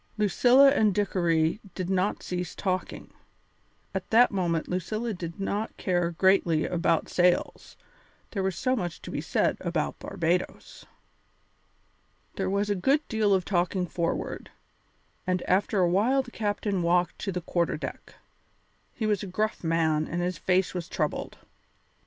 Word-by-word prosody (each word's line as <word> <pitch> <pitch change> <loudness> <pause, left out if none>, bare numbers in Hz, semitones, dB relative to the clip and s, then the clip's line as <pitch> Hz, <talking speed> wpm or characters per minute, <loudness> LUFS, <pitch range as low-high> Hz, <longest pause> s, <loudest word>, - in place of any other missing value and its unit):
Lucilla 245 +6 +5
and 215 -8 +2
Dickory 170 -4 +1 0.2
did 185 -2 -3
not 190 +2 0
cease 180 -1 -4
talking. 185 -2 -3 0.8
At 190 -1 -4
that 240 +2 +5
moment 170 -4 -1
Lucilla 215 +6 -2
did 170 -2 -7
not 205 +2 -3
care 175 -2 0
greatly 170 -2 +2
about 170 -2 +1
sails, 180 0 0 0.5
there 200 - -2
was 190 -2 -1
so 255 +6 0
much 175 -8 -4
to - - -7
be - - -3
said 165 - 0
about 170 -4 -2
Barbadoes. 180 -1 -3 1.5
There 190 -1 -1
was 200 +1 0
a - - +1
good 275 +11 +1
deal 220 -3 +1
of 190 -2 +2
talking 180 0 0
forward, 170 0 -3 0.8
and 185 -1 0
after 195 +1 +1
a 180 - +4
while 240 +9 +2
the 245 - -13
captain 205 -3 -1
walked 175 +1 +1
to 195 - -3
the 180 - -2
quarter 170 0 -1
deck. - - -8 0.8
He 220 - -2
was 210 -3 +1
a 200 - -5
gruff 215 +3 -2
man 160 -2 +1
and 170 - -3
his 175 -1 -2
face 185 0 +1
was 175 -2 -5
troubled. 155 -5 -3
185 Hz, 150 wpm, -27 LUFS, 175-205 Hz, 1.5 s, Lucilla